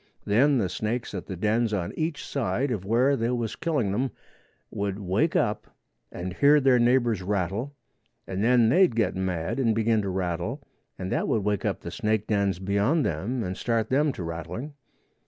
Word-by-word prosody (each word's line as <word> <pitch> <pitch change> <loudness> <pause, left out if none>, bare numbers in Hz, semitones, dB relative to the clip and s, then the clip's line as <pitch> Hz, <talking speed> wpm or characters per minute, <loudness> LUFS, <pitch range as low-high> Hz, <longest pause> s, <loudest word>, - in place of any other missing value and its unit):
Then 130 +7 +4
the 105 -6 +1
snakes 110 +5 -3
at 95 - -5
the 95 - -5
dens 110 +4 +1
on 85 -3 -3
each 155 -1 -2
side 130 +1 -1
of 105 -6 -2
where 120 +7 +3
they 115 -2 -1
was 120 -3 -2
killing 145 - 0
them 125 +7 0 0.6
would 100 -1 -2
wake 105 - 0
up 105 - -1 0.3
and 90 +1 -5
hear 145 +8 +5
their 130 -3 +4
neighbors' 120 -4 +2
rattle, 100 +8 -2 0.5
and 95 +2 -3
then 120 -1 +4
they'd 160 -2 +4
get 115 -2 +1
mad 95 +2 -2
and 115 -4 +2
begin 110 -1 +2
to 100 - -3
rattle 95 - -3 0.3
and 95 0 -5
that - - 0
would 110 - +1
wake 105 -1 -1
up - - -1
the - - -6
snake 110 -1 0
dens 100 -3 +1
beyond 100 - +1
them 110 +10 -2
and 90 0 -3
start 115 -1 -1
them 145 +2 +3
to 90 - -6
rattling. 85 - -6
110 Hz, 185 wpm, -26 LUFS, 95-125 Hz, 0.6 s, hear